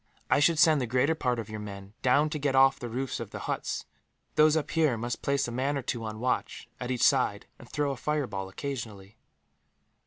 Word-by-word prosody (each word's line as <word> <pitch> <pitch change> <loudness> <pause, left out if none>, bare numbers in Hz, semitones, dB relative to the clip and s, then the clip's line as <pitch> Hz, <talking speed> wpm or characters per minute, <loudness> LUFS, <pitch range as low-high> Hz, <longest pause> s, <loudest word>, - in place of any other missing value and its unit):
"I - - +5
should 160 +2 +4
send 155 -2 +5
the 125 - -1
greater 130 +6 +2
part 125 -6 -1
of 115 -3 -4
your 110 -1 -6
men 100 -1 -8
down 145 +4 +3
to 150 - -2
get 140 -1 0
off 135 0 +5
the 120 - -5
roofs 130 +3 -3
of - - -6
the - - -7
huts. - - -3 0.5
Those 155 0 +5
up 150 -2 -2
here 155 -7 +2
must 120 +2 -4
place 140 -2 +1
a - - -5
man 135 +4 0
or 135 - -4
two 120 -1 -3
on 110 0 -5
watch, 125 0 -2
at 125 - -4
each 125 -2 0
side, 125 -7 +3
and 120 - -14
throw 145 -1 0
a - - -3
fireball 125 -10 -2
occasionally." 110 -4 -6
130 Hz, 220 wpm, -28 LUFS, 115-145 Hz, 0.5 s, I